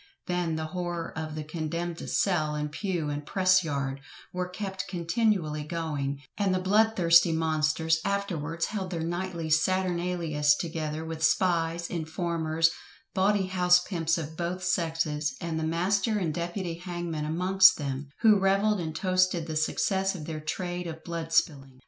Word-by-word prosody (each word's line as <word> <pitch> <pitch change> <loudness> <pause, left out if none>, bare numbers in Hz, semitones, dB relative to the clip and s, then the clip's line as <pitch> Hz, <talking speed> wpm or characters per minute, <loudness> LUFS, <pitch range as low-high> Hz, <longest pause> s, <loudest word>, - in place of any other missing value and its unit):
Then 175 -2 -1
the 160 0 -3
horror 175 -2 -4
of 155 -1 -4
the 155 - -4
"condemned 165 +2 -4
cell, 155 -6 +1
and 150 0 -3
pew, 175 -3 -2
and 145 0 -4
press 185 +3 +3
yard" 140 -3 -2 0.3
were 180 0 -2
kept 190 0 -5
continually 170 -4 0
going, 145 -4 -3 0.2
and 195 -2 +2
the - - +1
blood 215 +4 +3
thirsty 170 -2 +5
monsters 160 0 +1
afterwards 170 -5 -1
held 195 -4 -4
their 170 -3 -3
nightly 170 -1 -3
saturnalias 170 -3 +2
together, 160 -2 -3
with 160 -1 -6
spies, 170 0 +2
informers, 165 -1 0 0.4
bawdy 195 +1 +2
house 180 -1 +4
pimps 165 -3 -1
of 160 -1 -5
both 175 +2 -3
sexes, 160 -5 0
and 165 -1 -3
the - - -2
master 190 +6 +1
and 170 -6 -1
deputy 170 0 -4
hangman 175 -4 -4
amongst 185 +4 +5
them; 140 -1 -4
who 215 -3 +6
revelled 195 +2 +2
and 160 -2 -4
toasted 185 -2 +1
the 160 -1 -5
success 190 +5 +1
of 155 -5 -7
their 155 -1 -5
trade 175 +3 -4
of 160 -1 -7
blood 165 -1 -5
spilling. 135 -5 0
170 Hz, 155 wpm, -28 LUFS, 155-185 Hz, 0.4 s, who